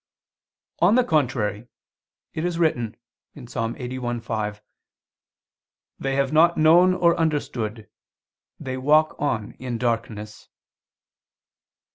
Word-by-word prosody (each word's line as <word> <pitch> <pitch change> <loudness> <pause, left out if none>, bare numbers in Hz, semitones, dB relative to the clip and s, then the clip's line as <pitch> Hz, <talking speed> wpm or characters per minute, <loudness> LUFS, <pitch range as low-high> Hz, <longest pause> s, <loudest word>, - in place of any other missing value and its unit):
On 185 +6 +4
the 255 - +4
contrary, 125 - 0 0.7
It 160 - -3
is 175 -1 -1
written 125 -10 0 0.4
(Ps. 125 -4 -11
81:5): 115 -3 -3 1.4
"They 135 0 -2
have 140 +1 0
not 170 +2 +5
known 175 +4 +5
or 170 -1 +3
understood, 120 -9 -2 0.7
they 130 0 -5
walk 155 +4 +3
on 120 -8 -1
in 125 -2 -4
darkness." 110 -3 -3
130 Hz, 95 wpm, -23 LUFS, 115-155 Hz, 1.4 s, not